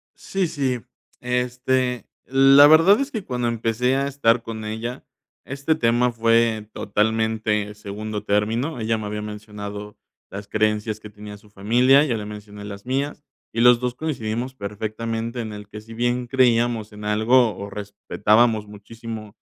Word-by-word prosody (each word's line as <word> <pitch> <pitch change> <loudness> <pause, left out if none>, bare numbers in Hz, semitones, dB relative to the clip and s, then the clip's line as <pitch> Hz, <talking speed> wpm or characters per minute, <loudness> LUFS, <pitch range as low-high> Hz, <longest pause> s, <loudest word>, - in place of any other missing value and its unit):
Sí, 195 -2 -2
sí, 130 -5 -1 0.4
este, 125 0 -1 0.2
la 135 +2 +7
verdad 165 - +6
es 275 0 -1
que 220 -8 -5
cuando 125 -2 -2
empecé 115 +2 0
a 140 0 0
estar 120 -4 +2
con 110 -1 -6
ella, 115 +4 -5 0.4
este 140 +3 -1
tema 120 0 +2
fue 115 -2 +2
totalmente 105 0 0
segundo 105 +1 -6
término, 115 +8 0
ella 110 0 0
me 105 - -5
había 105 0 -4
mencionado 105 -1 -8 0.3
las 100 0 -8
creencias 105 +1 0
que 105 - -11
tenía 105 0 -10
su 105 +1 -21
familia, 125 +8 +4
ya 130 -6 0
le 105 - -5
mencioné 105 -1 -9
las 100 0 -9
mías, 140 +3 -2 0.3
y 115 - -1
los 125 -1 +6
2 125 -1 -2
coincidimos 125 -5 -3
perfectamente 115 +2 -4
en 110 -2 -6
el 105 -1 -9
que 105 +1 -9
si 115 +1 -12
bien 120 +1 -1
creíamos 120 -3 +2
en 105 0 -9
algo 110 +2 +3
o 100 0 -6
respetábamos 105 +2 +1
muchísimo, 110 +1 -9
115 Hz, 155 wpm, -22 LUFS, 105-125 Hz, 0.4 s, la